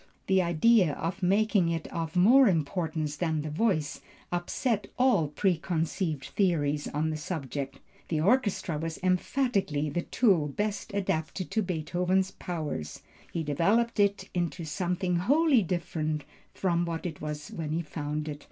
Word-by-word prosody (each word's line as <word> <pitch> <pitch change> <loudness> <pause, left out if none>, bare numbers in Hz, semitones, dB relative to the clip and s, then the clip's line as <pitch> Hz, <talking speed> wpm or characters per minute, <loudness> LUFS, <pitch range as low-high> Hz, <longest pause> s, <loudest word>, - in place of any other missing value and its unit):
The 190 -1 +3
idea 175 0 +4
of 175 +6 -4
making 200 -1 +3
it 165 -1 -2
of 165 0 -3
more 240 +9 +7
importance 155 -3 -1
than 160 -3 0
the 155 - -4
voice, 155 -4 0 0.3
upset 200 +5 -1
all 245 - +4
preconceived 165 -2 -1
theories 150 -7 +1
on 155 +2 -1
the 155 - -3
subject. 140 -4 -4 0.3
The 160 - 0
orchestra 200 - +1
was 165 0 -4
emphatically 185 - +1
the 175 - -1
tool 185 -8 +2
best 205 +8 -3
adapted 185 -2 -2
to 220 - +1
Beethoven's 180 +1 0
powers; 150 - -5 0.3
he 165 - -2
developed 205 +11 +1
it 200 0 +2
into 175 -1 -2
something 180 +2 -1
wholly 275 - +4
different 160 -4 -2 0.3
from 175 -2 0
what 165 0 -4
it 160 -4 -5
was 150 -1 -5
when 160 -2 -5
he 165 +2 -1
found 150 -1 -4
it. 145 -1 -5
170 Hz, 145 wpm, -29 LUFS, 155-195 Hz, 0.3 s, more